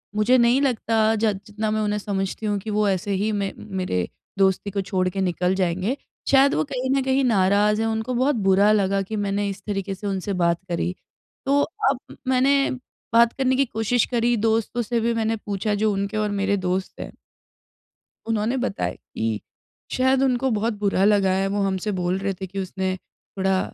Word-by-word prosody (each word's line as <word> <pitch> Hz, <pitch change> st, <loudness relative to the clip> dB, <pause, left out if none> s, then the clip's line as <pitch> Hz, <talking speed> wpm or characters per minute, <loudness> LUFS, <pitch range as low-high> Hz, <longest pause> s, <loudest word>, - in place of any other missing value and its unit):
मुझे 225 Hz, +5 st, +4 dB
नहीं 240 Hz, +3 st, +4 dB
लगता 225 Hz, -4 st, +2 dB
ज 220 Hz, 0 st, +2 dB
जितना 215 Hz, +1 st, -3 dB
मैं 215 Hz, 0 st, 0 dB
उन्हें 210 Hz, 0 st, 0 dB
समझती 200 Hz, +1 st, -3 dB
हूँ 205 Hz, -1 st, 0 dB
कि 215 Hz, +3 st, -7 dB
वो 210 Hz, 0 st, +1 dB
ऐसे 195 Hz, +1 st, -1 dB
ही 210 Hz, +3 st, 0 dB
मैं 200 Hz, -2 st, -1 dB, 0.3 s
मेरे 90 Hz, -, -1 dB, 0.3 s
दोस्ती 195 Hz, +1 st, +2 dB
को 200 Hz, 0 st, -1 dB
छोड़ 185 Hz, -1 st, -1 dB
के 195 Hz, +1 st, -3 dB
निकल 180 Hz, 0 st, 0 dB
जाएँगे। 185 Hz, +7 st, 0 dB, 0.3 s
शायद 275 Hz, +1 st, +5 dB
वो 155 Hz, -, +2 dB
कहीं 255 Hz, +1 st, -2 dB
न -, -, -1 dB
कहीं 265 Hz, +1 st, +2 dB
नाराज़ 210 Hz, -1 st, +3 dB
हैं, 225 Hz, -, +1 dB
उनको 220 Hz, +2 st, -2 dB
बहुत 260 Hz, +4 st, +2 dB
बुरा 200 Hz, 0 st, +4 dB
लगा 200 Hz, -2 st, +2 dB
कि 195 Hz, +3 st, -5 dB
मैंने 205 Hz, 0 st, -1 dB
इस 195 Hz, -, -7 dB
तरीक़े 195 Hz, -1 st, -2 dB
से 205 Hz, +2 st, -6 dB
उनसे 195 Hz, 0 st, -2 dB
बात 170 Hz, -2 st, +1 dB
करी। 175 Hz, +1 st, -1 dB, 0.5 s
तो 285 Hz, +1 st, +3 dB, 0.3 s
अब 270 Hz, -2 st, -5 dB
मैंने 275 Hz, +2 st, +3 dB, 0.4 s
बात 235 Hz, 0 st, +5 dB
करने 260 Hz, -1 st, +1 dB
की 275 Hz, -, +3 dB
कोशिश 225 Hz, 0 st, 0 dB
करी 240 Hz, 0 st, +2 dB
दोस्तों 225 Hz, +2 st, 0 dB
से 235 Hz, +1 st, -1 dB
भी 235 Hz, +1 st, +1 dB
मैंने 225 Hz, 0 st, 0 dB
पूछा 205 Hz, -1 st, -2 dB
जो 215 Hz, +1 st, +1 dB
उनके 200 Hz, +2 st, -2 dB
और 210 Hz, -1 st, 0 dB
मेरे 200 Hz, 0 st, 0 dB
दोस्त 185 Hz, 0 st, -3 dB
हैं -, -, -7 dB, 1.2 s
उन्होंने 225 Hz, +3 st, 0 dB
बताया 245 Hz, -5 st, -2 dB
कि 110 Hz, -1 st, -4 dB, 0.5 s
शायद 260 Hz, +1 st, +2 dB
उनको 260 Hz, 0 st, +1 dB
बहुत 220 Hz, +1 st, 0 dB
बुरा 195 Hz, -2 st, +1 dB
लगा 200 Hz, -2 st, +4 dB
है 195 Hz, +1 st, +1 dB
वो 200 Hz, +1 st, -1 dB
हमसे 195 Hz, +2 st, -1 dB
बोल 180 Hz, +1 st, 0 dB
रहे 195 Hz, 0 st, -2 dB
थे 190 Hz, -, -3 dB
कि 195 Hz, +2 st, -6 dB
उसने 190 Hz, 0 st, -2 dB, 0.4 s
थोड़ा 190 Hz, 0 st, +2 dB
210 Hz, 190 wpm, -23 LUFS, 195-230 Hz, 1.2 s, शायद